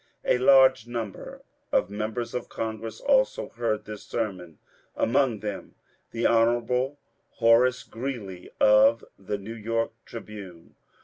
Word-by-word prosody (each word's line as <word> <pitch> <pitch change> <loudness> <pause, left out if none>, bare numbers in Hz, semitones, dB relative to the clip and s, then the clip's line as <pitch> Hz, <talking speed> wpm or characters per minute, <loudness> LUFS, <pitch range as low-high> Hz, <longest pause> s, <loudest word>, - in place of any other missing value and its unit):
A 125 - +2
large 130 -2 +5
number 115 -4 -6 0.3
of 90 - +1
members 110 +3 -4
of 125 - -4
Congress 110 0 -5
also - - +1
heard 110 -3 -2
this 105 -1 -8
sermon, 90 -8 -4 0.4
among 120 -3 +1
them 105 -2 -6 0.3
the 115 0 -3
Hon. 120 +4 +2 0.4
Horace 120 +2 +4
Greeley 115 -7 -6
of 110 +2 +5
the 100 +1 -4
New 100 +3 -8
York 115 +1 -2
" - - -48
Tribune." 100 -7 -10
115 Hz, 125 wpm, -26 LUFS, 105-125 Hz, 0.4 s, large